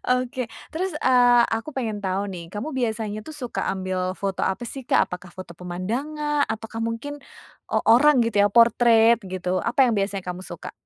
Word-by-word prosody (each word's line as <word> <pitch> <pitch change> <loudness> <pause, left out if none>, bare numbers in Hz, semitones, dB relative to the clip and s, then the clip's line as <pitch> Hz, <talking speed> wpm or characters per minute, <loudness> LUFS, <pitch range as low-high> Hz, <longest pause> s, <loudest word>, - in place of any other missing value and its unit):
Oke, 250 -1 0 0.2
terus, 370 +4 -2
eee, 245 -2 +6
aku 225 +6 -2
pengen 220 -5 -2
tau 195 0 -1
nih, 170 -2 -8
kamu 210 +9 -4
biasanya 220 -4 -2
tuh 315 - -8
suka 250 -5 -4
ambil 185 -1 -3 0.2
foto 195 -1 -3
apa 190 +6 -1
sih, 270 - -7
Kak? - - +4
Apakah 180 0 -8
foto 185 -2 -8
pemandangan? 260 - -2
Atau 220 +1 -4
kah 225 - -4
mungkin 230 +6 -5 0.6
o - - -1 0.2
orang 295 +6 +6
gitu 210 -3 +1
ya? 205 - +5
Portrait 230 0 +6 0.2
gitu? 185 0 -1
Apa 265 +3 +4
yang 245 - +2
biasanya 195 -1 -2
kamu 180 0 -4
suka? 185 - -8
225 Hz, 180 wpm, -24 LUFS, 190-250 Hz, 0.6 s, eee